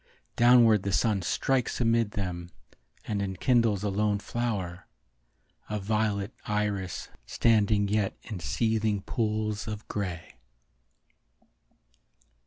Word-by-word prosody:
Downward 120 -3 +6
the 100 - -2
sun 100 0 +2
strikes 130 +7 0
amid 115 -3 +2
them 90 -3 -4 0.6
And 100 -1 -2
enkindles 105 +1 +1
a 105 - 0
lone 105 +1 +1
flower; 100 -6 -3 0.8
A 105 0 -2
violet 105 0 -1
iris 105 -3 -2 0.2
standing 105 -2 +3
yet 105 -1 0
in 105 -4 -6
seething 110 - 0
pools 110 -1 -2
of 105 0 -6
grey. 90 -5 -5
105 Hz, 100 wpm, -28 LUFS, 100-110 Hz, 0.8 s, Downward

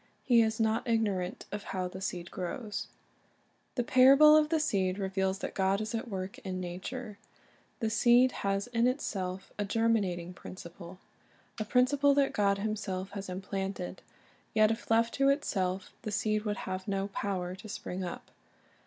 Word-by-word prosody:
He 240 -3 +5
is 220 0 0
not 225 +3 +1
ignorant 205 -6 0
of 205 - -4 0.2
how 185 -1 0
the 185 +1 -8
seed 175 -3 -4
grows. 195 +2 -4 0.9
The 245 - +1
parable 275 +5 +7
of 305 -1 +4
the 320 -1 +2
seed 190 -11 +1
reveals 190 -1 -1
that - - -5
God 195 +1 +1
is 215 0 -4
at 230 +1 -3
work 190 -2 -5
in 185 -1 -4
nature. 200 +5 -6 0.6
The 220 -1 0
seed 245 +2 +5
has 195 0 0
in 240 0 +1
itself 190 -8 -3
a - - +2
germinating 200 -5 0
principle, 175 0 -10 0.6
a 215 - -1
principle 275 +5 +3
that 280 -1 +2
God 200 -1 +2
Himself 200 -2 -3
has 200 -1 -6
implanted; 190 0 -4 0.5
yet 215 0 +5
if 225 - -5
left 230 +1 +3
to 275 0 +3
itself 190 -9 0
the 215 - -4
seed 215 0 0
would 205 -1 -1
have 185 +1 -4
no 195 0 -1
power 190 -3 -3
to 205 +3 -10
spring 185 -2 -5
up. 175 - -7
205 Hz, 160 wpm, -31 LUFS, 190-230 Hz, 0.9 s, parable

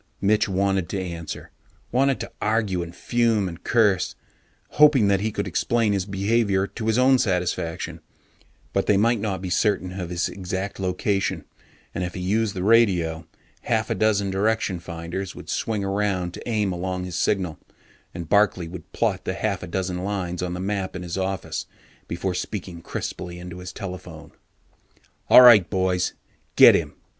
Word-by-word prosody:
Mitch 105 +2 +2
wanted 95 -1 0
to 100 - -2
answer, 85 -4 -6 0.4
wanted 135 +2 +2
to - - -6
argue 105 -4 0
and 85 0 -7
fume 115 -1 +1
and 85 -1 -8
curse, 105 -6 +2 0.5
hoping 145 -8 +5
that 100 -1 +3
he 110 +2 -1
could - - -3
explain 115 -3 +1
his 95 -1 -1
behaviour 100 0 +1
to 110 +2 -6
his 110 +1 +2
own 130 +1 +5
satisfaction. 90 -4 -1 0.7
But - - 0
they 105 - +4
might 115 +3 +3
not 100 -3 -3
be 90 - -4
certain 95 -2 0
of 90 -2 -4
his 90 0 -1
exact 95 +1 -5
location, 95 +2 -1 0.5
and 90 - -2
if 90 -1 -5
he - - -4
used 105 +3 0
the 90 - -3
radio, 90 -8 +3 0.4
half - - 0
a - - +4
dozen 100 -3 +1
direction 100 -1 0
finders 85 +2 -6
would - - -11
swing 110 -3 -1
around 95 -3 -1
to - - -8
aim 105 -4 +1
along 90 +1 -3
his 90 -1 -6
signal, 90 -6 0 0.5
and 85 -2 -7
Barkley 100 -3 +2
would 85 0 -10
plot - - 0
the - - -3
half - - -2
a - - -6
dozen 90 +1 -3
lines 95 -3 -3
on 90 -1 -3
the - - -5
map 95 0 -2
in 90 - -5
his 85 -1 -5
office 95 0 -3 0.4
before 90 +2 -2
speaking 90 -2 -5
crisply 90 +1 -5
into 90 0 -8
his 90 0 -7
telephone: 90 -5 -8 1.0
_all 125 - +10
right, 110 -7 +8
boys 95 -2 0 0.4
get - - +9
him! - - -1
95 Hz, 170 wpm, -24 LUFS, 90-105 Hz, 1.0 s, all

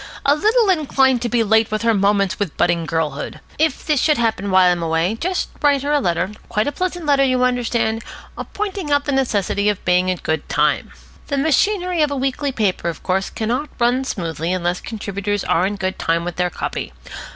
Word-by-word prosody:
"A 285 - +5
little 435 +5 +3
inclined 265 -6 +2
to 240 - -1
be 235 0 +2
late 220 +1 +3
with 215 +1 -2
her 230 0 +3
'Moments 200 -1 +1
with 200 -7 -3
Budding 170 -2 +1
Girlhood'. 155 -3 -3 0.2
If 315 -3 0
this 300 -4 +2
should 305 -2 +3
happen 220 -4 0
while 185 -1 +5
I - - +5
am 175 -1 -1
away, 165 +4 0
just 370 +1 -1
write 285 -2 +3
her 290 - -1
a 295 - +3
letter, 180 -3 0 0.2
quite 215 -1 0
a 290 - -1
pleasant 355 0 -3
letter, 280 -2 +4
you 255 -1 +2
understand, 235 -2 0 0.5
pointing 395 -6 -3
out 285 0 +2
the 285 - -1
necessity 210 -6 +1
of 205 - -3
being 180 +1 +3
in 185 - 0
good 160 -1 -3
time. - - +1 0.4
The 280 - -1
machinery 350 - +1
of 300 - +3
a 285 - -3
weekly 270 +1 -1
paper, 200 -8 0
of 165 - -7
course, 190 +1 0
cannot 240 +7 -2
run 245 +2 +2
smoothly 165 - -3
unless 180 -1 -1
contributors 205 -2 -3
are 180 +3 +2
in 205 - -3
good 190 -1 -3
time 170 +1 0
with 175 - -5
their 180 0 +1
copy. 110 - -5
225 Hz, 205 wpm, -20 LUFS, 185-285 Hz, 0.5 s, A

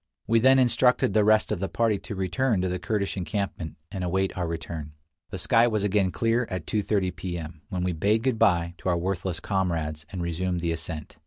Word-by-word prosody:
We 115 +1 +3
then 130 +3 +6
instructed 125 -4 +3
the 105 0 +4
rest 110 +1 +4
of 105 - -1
the 95 - -2
party 115 -4 +1
to 105 - -7
return 95 +3 0
to 95 - 0
the 90 0 -2
Kurdish 100 +2 -1
encampment 90 -3 -3 0.2
and 95 -2 -4
await 95 +2 0
our 90 -2 -2
return. 80 -2 -5 0.4
The - - -5
sky 115 +1 +4
was 110 -3 0
again 100 -2 +2
clear 115 +8 +1
at 90 -4 -4
2:30 100 -3 0
P. 90 -2 -4
M., 80 -1 -8
when 90 -1 -2
we 90 -1 0
bade 105 +7 +1
good 125 -4 0
by 85 -6 +3
to - - -2
our 85 - +2
worthless 90 0 -2
comrades 80 -6 -2
and 90 -3 -4
resumed 85 +1 -1
the 85 -1 0
ascent. 80 -1 -5
95 Hz, 215 wpm, -26 LUFS, 85-105 Hz, 0.4 s, then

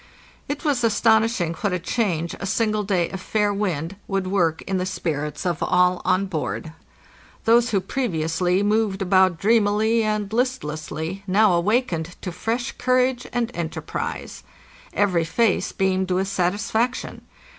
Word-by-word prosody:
It 290 +3 -4
was 275 -5 +1
astonishing 220 -5 +3
what 180 +3 -2
a - - +1
change 175 -4 -1
a 195 - -4
single 215 +1 +1
day 185 -4 0
of 190 - -6
fair 210 +1 0
wind 185 -3 -2
would 195 -1 -1
work 175 -4 +1
in 190 -1 -1
the 180 - -1
spirits 150 -4 -3
of 175 -2 -1
all 180 0 +3
on 185 +2 +2
board. 160 -2 -4 0.7
Those 235 +1 +5
who 205 -4 +2
previously 180 -4 0
moved 210 -2 +1
about 185 -2 +4
dreamily 220 +2 +3
and 215 -1 -1
listlessly 170 - -2
now 200 +1 +4
awakened 175 -3 0
to 180 - -3
fresh 225 +7 -2
courage 255 0 +1
and 240 -1 -1
enterprise. 165 -2 -4 0.5
Every 185 -5 +2
face 215 +5 +1
beamed 190 -1 0
with 185 +1 +1
satisfaction. 205 +6 -1
195 Hz, 140 wpm, -23 LUFS, 175-220 Hz, 0.7 s, Those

